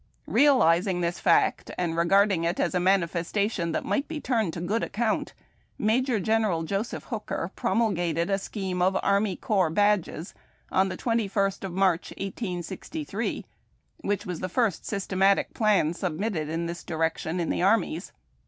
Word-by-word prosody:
Realizing 190 Hz, -, +4 dB
this 170 Hz, +1 st, -1 dB
fact, 170 Hz, -, +2 dB
and 170 Hz, -2 st, -1 dB
regarding 190 Hz, +1 st, +3 dB
it 170 Hz, +2 st, -1 dB
as -, -, +1 dB
a 180 Hz, -, +2 dB
manifestation 180 Hz, 0 st, +1 dB
that -, -, -2 dB
might 280 Hz, -, 0 dB
be 315 Hz, -1 st, -4 dB
turned 230 Hz, -, 0 dB
to -, -, -5 dB
good 200 Hz, +7 st, -1 dB
account, 220 Hz, 0 st, -1 dB, 0.4 s
^Major 235 Hz, +2 st, +2 dB
General 210 Hz, -4 st, +1 dB
Joseph 200 Hz, +7 st, -3 dB
Hooker -, -, -4 dB
promulgated 175 Hz, -7 st, 0 dB
a 195 Hz, 0 st, +1 dB
scheme 190 Hz, -3 st, -4 dB
of 190 Hz, +1 st, +3 dB
army 200 Hz, -1 st, +2 dB
corps 190 Hz, -5 st, +1 dB
badges 205 Hz, -1 st, +1 dB, 0.4 s
on 190 Hz, +1 st, +3 dB
the -, -, -5 dB
21st 200 Hz, -5 st, 0 dB
of 190 Hz, -3 st, -4 dB
March, 185 Hz, -2 st, +1 dB
1863, 195 Hz, -, -4 dB, 0.5 s
which 205 Hz, -, -2 dB
was 180 Hz, -4 st, -4 dB
the 185 Hz, -, -3 dB
iirst 220 Hz, -3 st, 0 dB
systematic 195 Hz, -1 st, +1 dB
plan 205 Hz, -8 st, +2 dB
submitted 175 Hz, -1 st, -2 dB
in 165 Hz, +1 st, -2 dB
this 170 Hz, 0 st, -5 dB
direction 160 Hz, +1 st, -2 dB
in 170 Hz, -, -1 dB
the -, -, -1 dB
armies. 185 Hz, -3 st, +1 dB
190 Hz, 150 wpm, -26 LUFS, 170-215 Hz, 0.5 s, Realizing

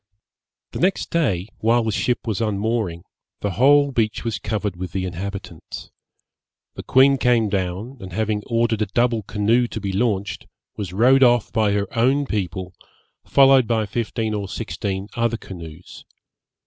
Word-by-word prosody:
The -, -, -6 dB
next 185 Hz, +2 st, 0 dB
day, 100 Hz, -, 0 dB
while 115 Hz, +2 st, +3 dB
the 110 Hz, -, -1 dB
ship 120 Hz, +4 st, -1 dB
was 110 Hz, -2 st, -2 dB
unmooring, 105 Hz, -4 st, -1 dB, 0.4 s
the 100 Hz, -, -1 dB
whole 140 Hz, +7 st, +4 dB
beach 110 Hz, -4 st, -1 dB
was 115 Hz, -3 st, -2 dB
covered 105 Hz, -4 st, -3 dB
with 90 Hz, -1 st, -6 dB
the 95 Hz, -1 st, -2 dB
inhabitants. 95 Hz, +2 st, -7 dB, 0.8 s
The -, -, -7 dB
queen 135 Hz, +1 st, +4 dB
came 120 Hz, -3 st, +3 dB
down, 100 Hz, +6 st, -3 dB
and 95 Hz, -1 st, -9 dB
having 105 Hz, +2 st, -1 dB
ordered 115 Hz, -2 st, +1 dB
a 105 Hz, -, +1 dB
double 120 Hz, +2 st, +1 dB
canoe 110 Hz, +4 st, +1 dB
to 110 Hz, -, -6 dB
be 100 Hz, -2 st, -4 dB
launched, 100 Hz, -1 st, -1 dB, 0.3 s
was 100 Hz, -5 st, -5 dB
rowed 125 Hz, +8 st, +4 dB
off 120 Hz, -3 st, +4 dB
by 110 Hz, -3 st, +2 dB
her 100 Hz, 0 st, 0 dB
own 135 Hz, +5 st, +2 dB
people, 95 Hz, -5 st, -3 dB, 0.5 s
followed 135 Hz, -3 st, +5 dB
by 110 Hz, -2 st, +1 dB
fifteen 110 Hz, 0 st, -2 dB
or 100 Hz, -2 st, -3 dB
sixteen 100 Hz, -2 st, -4 dB
other 115 Hz, -1 st, 0 dB
canoes. 85 Hz, -4 st, -11 dB
110 Hz, 155 wpm, -22 LUFS, 100-120 Hz, 0.8 s, followed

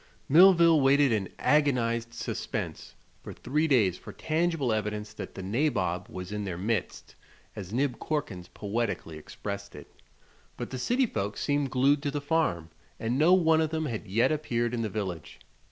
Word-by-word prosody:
Millville 170 Hz, -1 st, +6 dB
waited 140 Hz, 0 st, +4 dB
in 105 Hz, -4 st, -1 dB
agonized 120 Hz, -6 st, +1 dB
suspense 115 Hz, -, -5 dB, 0.3 s
for -, -, -8 dB
three 150 Hz, +5 st, -1 dB
days 105 Hz, -, +2 dB
for -, -, -10 dB
tangible 160 Hz, -6 st, 0 dB
evidence 105 Hz, 0 st, -3 dB
that -, -, -8 dB
"the 95 Hz, -, -6 dB
nabob 95 Hz, -, -1 dB
was 90 Hz, +1 st, -7 dB
in 105 Hz, 0 st, -3 dB
their 90 Hz, -4 st, -4 dB
midst," 105 Hz, +1 st, -3 dB, 0.4 s
as 95 Hz, -2 st, -7 dB
Nib 130 Hz, +2 st, -1 dB
Corkins 100 Hz, -, -3 dB
poetically 100 Hz, -7 st, -3 dB
expressed 100 Hz, +5 st, -7 dB
it; 75 Hz, -, -12 dB, 0.6 s
but -, -, -6 dB
the 130 Hz, -, -4 dB
city 250 Hz, -, +2 dB
folks 105 Hz, -, -4 dB
seemed 145 Hz, -1 st, 0 dB
glued 140 Hz, +3 st, +3 dB
to 145 Hz, -, -1 dB
the 145 Hz, +1 st, -2 dB
farm 140 Hz, -, -1 dB, 0.3 s
and 120 Hz, +4 st, -1 dB
no 165 Hz, +4 st, +5 dB
one 160 Hz, -3 st, +4 dB
of 160 Hz, -, 0 dB
them 160 Hz, 0 st, -2 dB
had 115 Hz, -7 st, -4 dB
yet 110 Hz, +9 st, +2 dB
appeared 120 Hz, -6 st, -1 dB
in 120 Hz, -, -1 dB
the 110 Hz, -, -2 dB
village. 95 Hz, -6 st, -5 dB
120 Hz, 170 wpm, -28 LUFS, 100-150 Hz, 0.6 s, Millville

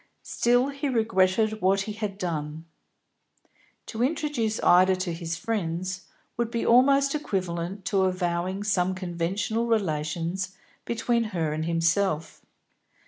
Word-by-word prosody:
Still, 245 Hz, +3 st, +2 dB
he 280 Hz, 0 st, -3 dB
regretted 215 Hz, -2 st, +2 dB
what 195 Hz, +2 st, +3 dB
he 215 Hz, +2 st, -4 dB
had 210 Hz, -2 st, -4 dB
done. 160 Hz, -3 st, -4 dB, 1.2 s
To 225 Hz, -, -5 dB
introduce 265 Hz, -6 st, 0 dB
Ida 185 Hz, +1 st, +6 dB
to 185 Hz, -2 st, -3 dB
his 165 Hz, 0 st, -4 dB
friends 185 Hz, -3 st, -3 dB, 0.3 s
would 235 Hz, -1 st, 0 dB
be 235 Hz, -1 st, -2 dB
almost 275 Hz, +3 st, +5 dB
equivalent 185 Hz, -, -3 dB
to 190 Hz, 0 st, +2 dB
avowing 185 Hz, +1 st, -1 dB
some 185 Hz, -2 st, +1 dB
conventional 185 Hz, +6 st, -2 dB
relations 175 Hz, -2 st, -1 dB, 0.3 s
between 235 Hz, 0 st, 0 dB
her 165 Hz, -8 st, -2 dB
and 155 Hz, +1 st, -2 dB
himself. 165 Hz, 0 st, 0 dB
190 Hz, 120 wpm, -26 LUFS, 170-225 Hz, 1.2 s, Ida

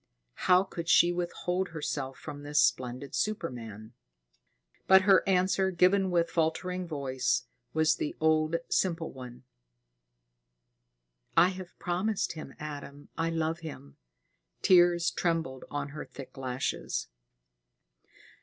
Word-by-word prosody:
How 180 Hz, +1 st, +7 dB
could 170 Hz, -3 st, -6 dB
she 175 Hz, +1 st, +6 dB
withhold 180 Hz, +1 st, -2 dB
herself 140 Hz, -4 st, -4 dB
from 145 Hz, -, -8 dB
this 145 Hz, +1 st, 0 dB
splendid 125 Hz, +1 st, 0 dB
superman? 120 Hz, -, -4 dB, 0.9 s
But 190 Hz, 0 st, +7 dB
her 195 Hz, -1 st, +6 dB
answer, 190 Hz, 0 st, +2 dB
given 190 Hz, +2 st, +3 dB
with 170 Hz, -1 st, +1 dB
faltering 180 Hz, +3 st, -1 dB
voice, 135 Hz, -4 st, -1 dB, 0.3 s
was 160 Hz, 0 st, +3 dB
the -, -, -3 dB
old, 155 Hz, 0 st, +2 dB
simple 170 Hz, -3 st, 0 dB
one: 125 Hz, -1 st, -10 dB, 1.9 s
"I 180 Hz, -, +7 dB
have 185 Hz, -1 st, -9 dB
promised 185 Hz, +4 st, -1 dB
him, 155 Hz, -4 st, -9 dB
Adam. 145 Hz, -1 st, -8 dB
I 165 Hz, 0 st, 0 dB
love 165 Hz, 0 st, -1 dB
him." 145 Hz, -, -10 dB, 0.7 s
Tears 175 Hz, -2 st, +5 dB
trembled 165 Hz, -7 st, -2 dB
on 145 Hz, 0 st, -3 dB
her 150 Hz, +1 st, -7 dB
thick 135 Hz, -, -11 dB
lashes. 130 Hz, -1 st, -3 dB
160 Hz, 115 wpm, -29 LUFS, 140-180 Hz, 1.9 s, How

